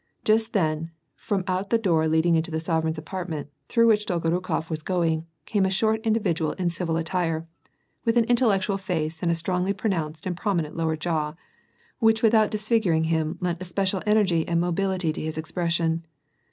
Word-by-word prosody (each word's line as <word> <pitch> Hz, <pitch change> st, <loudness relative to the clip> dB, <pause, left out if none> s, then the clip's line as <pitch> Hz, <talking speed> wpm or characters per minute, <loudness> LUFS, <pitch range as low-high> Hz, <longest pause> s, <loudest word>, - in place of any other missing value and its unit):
Jast 220 Hz, +1 st, +3 dB
then, 160 Hz, -4 st, 0 dB, 0.3 s
from 195 Hz, -3 st, -2 dB
out 190 Hz, +1 st, -1 dB
the 230 Hz, -, +4 dB
door 170 Hz, -8 st, +2 dB
lesuling 160 Hz, +2 st, +3 dB
into 160 Hz, +1 st, 0 dB
the 160 Hz, -, -2 dB
sorereign's 160 Hz, -1 st, 0 dB
apart 180 Hz, +3 st, -5 dB
ments, 150 Hz, -2 st, -5 dB, 0.2 s
through 230 Hz, -1 st, +4 dB
which 210 Hz, -2 st, +3 dB
Dolgorukof 170 Hz, -1 st, -1 dB
was 160 Hz, -1 st, -4 dB
going, 165 Hz, -2 st, 0 dB, 0.2 s
came 205 Hz, -3 st, +1 dB
a 190 Hz, -, +2 dB
short 220 Hz, +3 st, +1 dB
in 220 Hz, -2 st, +2 dB
dividual 170 Hz, -8 st, 0 dB
in 180 Hz, -2 st, -1 dB
civil 170 Hz, -1 st, -1 dB
attire, 165 Hz, -1 st, -1 dB, 0.6 s
with 230 Hz, +1 st, +2 dB
an 235 Hz, -, +6 dB
intellectual 215 Hz, -5 st, +2 dB
face 160 Hz, -4 st, -3 dB
and 175 Hz, -, +1 dB
a 170 Hz, -, +2 dB
strongly 180 Hz, +3 st, 0 dB
pronounced 165 Hz, -7 st, -2 dB
and 180 Hz, -1 st, -2 dB
prominent 170 Hz, -5 st, -1 dB
lower 160 Hz, -1 st, 0 dB
jaw, 155 Hz, -1 st, -1 dB, 0.6 s
which 225 Hz, -1 st, +3 dB
without 220 Hz, -1 st, +5 dB
disfig 215 Hz, +2 st, +1 dB
uring 160 Hz, -2 st, +2 dB
him 160 Hz, 0 st, 0 dB
lent 175 Hz, -1 st, -1 dB
especial 185 Hz, +1 st, -1 dB
energy 195 Hz, -6 st, +3 dB
and 170 Hz, -1 st, +1 dB
mobility 180 Hz, -1 st, 0 dB
to -, -, -5 dB
his 155 Hz, 0 st, -4 dB
expression. 165 Hz, 0 st, -1 dB
175 Hz, 180 wpm, -25 LUFS, 160-200 Hz, 0.6 s, an